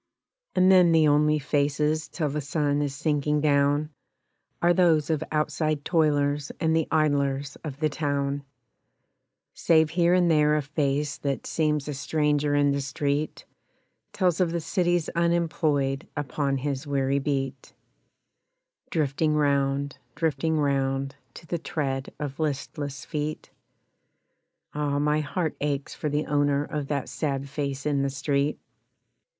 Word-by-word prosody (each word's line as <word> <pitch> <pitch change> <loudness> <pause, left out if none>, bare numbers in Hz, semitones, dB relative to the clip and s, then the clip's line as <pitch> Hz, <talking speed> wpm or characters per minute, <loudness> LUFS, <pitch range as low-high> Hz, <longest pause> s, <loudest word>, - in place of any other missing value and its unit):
And 185 0 +5
then 180 -3 +6
the 160 -1 +5
only 150 +1 +4
faces 150 +2 0
till 155 -4 -2
the 150 +2 -2
sun 145 0 0
is 140 -2 -2
sinking 150 0 0
down 145 +1 +2 0.7
Are 175 0 +4
those 165 -4 +3
of 155 - 0
outside 155 -1 -1
toilers 145 -3 +1
and 160 -1 +2
the 160 -1 +1
idlers 140 -2 +1
of 145 -3 -6
the 155 - +2
town, 140 -1 -2 1.1
Save 160 -2 +3
here 175 +1 +3
and 175 -2 +3
there 150 -1 +4
a 150 - 0
face 145 0 -1
that 140 -2 -2
seems 150 -3 0
a 150 - -3
stranger 150 0 0
in 145 0 +3
the 140 0 0
street, 140 +2 -2 0.7
Tells 180 -2 +1
of 175 -2 +2
the 170 - -1
city's 175 0 0
unemployed 160 -4 0
upon 140 -1 -1
his 140 +1 -3
weary 140 0 +1
beat 135 -2 -3 1.2
Drifting 155 0 0
round, 140 -1 +1 0.2
drifting 160 0 0
round, 135 -1 0 0.2
To - - -11
the 170 +1 -3
tread 135 -4 -3
of 145 -1 -5
listless 145 -1 -3
feet 150 0 -4 1.2
Ah! 145 -1 -1
My 150 +1 +2
heart 155 +2 -2
aches 145 -1 -2
for 150 - -3
the 150 +1 -1
owner 145 -1 +1
of 145 -1 -4
that 140 -2 -2
sad 140 -2 -2
face 140 -1 -4
in 145 -2 +1
the 140 - 0
street. 140 +1 0
145 Hz, 140 wpm, -26 LUFS, 140-155 Hz, 1.2 s, then